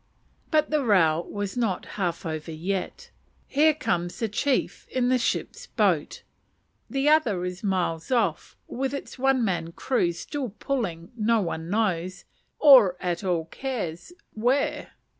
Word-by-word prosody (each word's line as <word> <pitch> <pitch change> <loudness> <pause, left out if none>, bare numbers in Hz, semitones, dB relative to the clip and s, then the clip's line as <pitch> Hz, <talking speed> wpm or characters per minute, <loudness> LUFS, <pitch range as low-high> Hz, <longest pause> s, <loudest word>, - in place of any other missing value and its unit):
But 310 -2 +2
the 305 -2 +2
row 170 -7 +3
is 200 -1 -3
not 225 -7 -1
half 180 -3 -2
over 160 0 -4
yet. 190 - -4 0.3
Here 305 +2 +3
comes 175 - -2
the 225 - -1
chief 260 +6 -1
in 250 -1 0
the 255 0 +3
ship's 470 - -2
boat. - - 0 0.7
The 275 +1 0
other 240 - +3
is 180 +2 -6
miles 180 -5 -1
off 215 -11 0
with 270 +2 -2
its 280 - -8
one 265 -2 +3
man 170 -4 -2
crew 240 -8 0
still 240 - -5
pulling 185 -12 -3
no 230 0 +2
one 165 -3 -3
knows, 185 -4 -1 0.3
or 245 -11 +7
at 175 0 -2
all 175 -4 0
cares, 205 - -5 0.2
where. 250 +6 0
210 Hz, 140 wpm, -26 LUFS, 175-260 Hz, 0.7 s, or